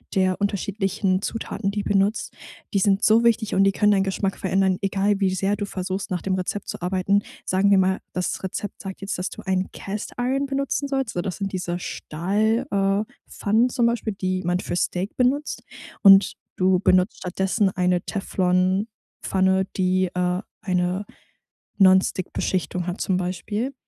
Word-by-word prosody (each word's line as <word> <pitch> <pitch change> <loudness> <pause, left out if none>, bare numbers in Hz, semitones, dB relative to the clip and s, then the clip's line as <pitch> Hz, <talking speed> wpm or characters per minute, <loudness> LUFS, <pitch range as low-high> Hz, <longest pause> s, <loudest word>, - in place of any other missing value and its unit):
der 185 +1 +1
unterschiedlichen 195 -1 0
Zutaten, 210 -2 -3
die 205 0 -2
benutzt, 205 +2 0 0.4
die 200 - +3
sind 195 +2 +2
so 225 +2 +5
wichtig 225 -2 +2
und 195 - +5
die 195 - +4
können 210 +1 +3
deinen 195 -1 +3
Geschmack 195 0 -2
verändern, 190 -1 +1
egal 200 +1 +1
wie 190 -1 +1
sehr 195 +2 0
du 205 - -3
versuchst, 190 +1 -4
nach 180 -2 -2
dem 190 - -1
Rezept 190 +2 -3
zu - - -6
arbeiten. 190 +3 +1 0.2
Sagen 190 +2 +2
wir 195 - +6
mal: 190 0 +2
Das 180 0 -2
Rezept 195 +2 -5
sagt 195 -1 -7
jetzt, 195 -1 -3
dass 180 - -2
du - - -9
einen 185 0 0
Cast 200 +1 -6
Iron 265 +3 0
benutzen 275 +1 -1
sollst 270 -4 -1
so, 175 - -1
das 185 0 -4
sind 195 -1 -4
diese 180 -1 -2
Stahl 210 +11 -1
äh 195 +1 +2 0.3
Pfannen 225 +5 +2
zum 240 -2 +1
Beispiel, 235 -2 0
die 185 -1 -2
man 175 +1 0
für - - -4
Steak 180 +2 -2
benutzt 270 +4 0 0.4
und 195 -1 +7 0.2
du 185 -1 +3
benutzt 185 0 +3
stattdessen 190 +3 0
eine 180 -1 +1
Teflonpfanne, 190 0 0
die, 185 0 +2
äh, 180 +1 0 0.2
eine 185 0 -1 0.7
Non-stick 190 -1 +4
Beschichtung 180 -1 -2
hat 180 - -4
zum 190 -3 +1
Beispiel 205 +8 -3
195 Hz, 170 wpm, -23 LUFS, 185-205 Hz, 0.7 s, und